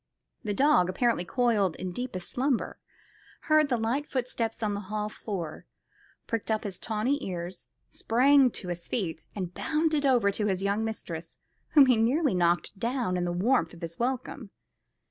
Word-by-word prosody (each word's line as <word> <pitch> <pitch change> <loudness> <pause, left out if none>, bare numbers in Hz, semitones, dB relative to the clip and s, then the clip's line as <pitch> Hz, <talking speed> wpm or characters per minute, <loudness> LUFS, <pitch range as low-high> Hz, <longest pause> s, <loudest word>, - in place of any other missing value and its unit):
The 205 -3 -2
dog, 195 -9 +4
apparently 230 +1 +1
coiled 215 -5 +1
in 185 -1 -5
deepest 215 -3 -5
slumber, 260 -1 -1 0.6
heard 310 -1 +3
the 245 - +2
light 240 +6 -1
footsteps 235 -3 -2
on 210 -1 0
the 200 - -3
hall 210 0 -2
floor, 180 -8 -6 0.6
pricked 230 -1 -3
up 220 -1 0
his 195 -3 -4
tawny 230 +6 -1
ears, 175 0 -5 0.2
sprang 265 +3 +4
to 185 -5 -6
his 175 -1 -4
feet, 165 -8 -3
and 180 -3 -4
bounded 310 - 0
over 245 -7 +4
to 210 +1 -1
his 190 -1 -1
young 200 +2 +1
mistress, 170 -7 -6 0.4
whom 290 -3 +8
he 250 -3 +4
nearly 260 - +2
knocked 175 +2 +1
down 235 -4 -1
in 180 -1 0
the 175 - -1
warmth 180 -1 +1
of 170 - -15
his 165 0 -6
welcome. 255 -1 -3
220 Hz, 165 wpm, -28 LUFS, 185-255 Hz, 0.6 s, whom